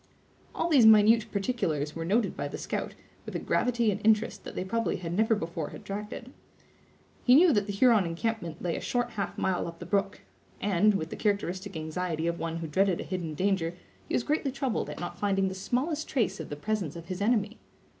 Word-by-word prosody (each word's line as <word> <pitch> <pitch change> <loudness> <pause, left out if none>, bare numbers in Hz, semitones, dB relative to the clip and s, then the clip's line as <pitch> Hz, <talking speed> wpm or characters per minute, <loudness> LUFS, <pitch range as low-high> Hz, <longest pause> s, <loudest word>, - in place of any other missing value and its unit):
All 330 - 0
these 275 -9 +6
minute 220 +1 +6
particulars 175 - -1
were 165 - -3
noted 205 +4 +1
by - - -3
the - - -6
scout, - - -4 0.3
with - - -8
a - - +2
gravity 235 -3 +1
and 200 - -4
interest 220 +1 +2
that - - -8
they - - -2
probably 230 +3 0
had 170 -2 -5
never 220 +4 +3
before 165 -4 -4
attracted. 210 +5 -7 0.9
He 250 - +6
knew 330 +1 +7
that 205 -1 +1
the - - -2
Huron 210 -2 +4
encampment 170 -1 -3
lay 170 -2 0
a - - -4
short 245 -1 -1
half 200 -4 -4
mile 185 -2 0
up 170 0 -8
the 175 - -8
brook; 200 +2 -1 0.4
and, 205 +1 +3
with 160 -3 -3
the - - -4
characteristic 200 -3 -1
anxiety 160 +1 -3
of 170 0 -1
one 165 0 -3
who 165 -1 -4
dreaded 190 +3 +2
a - - -3
hidden 170 -5 -4
danger, 180 -2 0 0.3
he - - 0
was - - +1
greatly 290 -1 0
troubled 265 -3 -2
at - - -7
not 175 0 -6
finding 195 -2 +1
the - - -5
smallest 275 - -2
trace 235 -9 0
of 160 - -6
the 145 - -4
presence 185 -1 -2
of 170 -1 -8
his 185 +2 -5
enemy. 215 0 +1
200 Hz, 210 wpm, -29 LUFS, 170-225 Hz, 0.9 s, knew